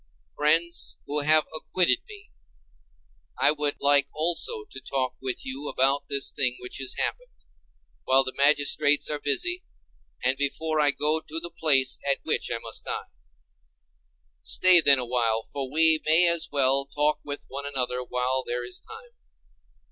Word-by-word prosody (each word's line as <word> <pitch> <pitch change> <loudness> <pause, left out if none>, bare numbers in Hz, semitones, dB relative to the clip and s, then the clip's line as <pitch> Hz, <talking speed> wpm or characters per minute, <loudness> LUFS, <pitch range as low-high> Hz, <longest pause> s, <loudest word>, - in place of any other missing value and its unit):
Friends, 165 +3 +1
who 145 - -2
would 145 0 0
have 155 0 +5
acquitted 180 - +1
me, 420 0 -13 1.1
I 140 +3 +4
would 150 -1 -2
like 140 -1 +3
also 175 - -1
to 425 - -11
talk 130 -2 -3
with 130 -2 -5
you 135 +3 -5
about 140 +2 0
this 140 -1 -1
thing 125 -2 0
which 125 - -9
has 135 -1 -5
happened, - - -5 0.6
while 135 +1 +4
the 130 -1 -6
magistrates 145 +1 +3
are 150 - -2
busy, 355 - -1 0.6
and 130 +2 0
before 155 +2 -1
I 145 -1 +5
go 150 +3 +2
to 160 +1 -6
the 170 +1 -8
place 140 -6 +2
at 140 - +3
which - - -1
I - - -1
must - - -7
die. - - -5 1.3
Stay 185 -2 +5
then 140 -3 +5
awhile, 120 -3 -1
for 135 +1 -6
we 160 +1 +4
may 160 +3 +5
as 170 -1 +1
well 135 -1 +2
talk 150 +2 0
with 145 0 -7
one 140 +1 -6
another 125 -2 -2
while 125 +1 -1
there 120 0 -4
is 120 - -6
time. 460 +2 -14
145 Hz, 160 wpm, -25 LUFS, 130-160 Hz, 1.3 s, have